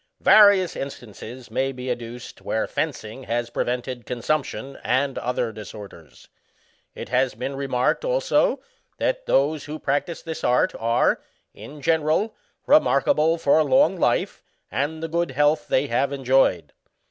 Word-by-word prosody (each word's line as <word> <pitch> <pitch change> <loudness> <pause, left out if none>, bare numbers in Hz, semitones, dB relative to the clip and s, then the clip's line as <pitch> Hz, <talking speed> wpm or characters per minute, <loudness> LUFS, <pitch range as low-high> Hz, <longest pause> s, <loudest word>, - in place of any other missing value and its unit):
Various 200 -4 +6
in 140 - -3
stances 120 +1 -11
may 135 +1 0
be 125 -1 -5
adduced 120 0 -7
where - - -1
fencing 110 +5 -4
has 120 0 -2
prevented 125 -1 -3
consumption 135 +2 -3
and 135 +2 0
other 125 -2 -2
disorders. 100 - -11 0.7
It - - -7
has 125 +1 +1
been 135 +2 -4
re 140 0 -4
marked, 125 - +1
also, - - +1 0.4
that - - -1
those 145 +2 +1
who 150 +1 -6
practise 145 +4 -2
this 160 -2 -6
art 125 - +2
are, 115 +1 +2 0.3
in 145 -1 -11
general, 160 +8 +1 0.3
remarkable 160 - +3
for 155 0 +3
long 260 - +3
life, 175 - 0 0.3
and 145 - -2
the - - -1
good 170 +2 -1
health 150 +3 +1
they 130 - +2
have 135 +1 0
enjoyed. 130 - +1
135 Hz, 140 wpm, -23 LUFS, 125-155 Hz, 0.7 s, Various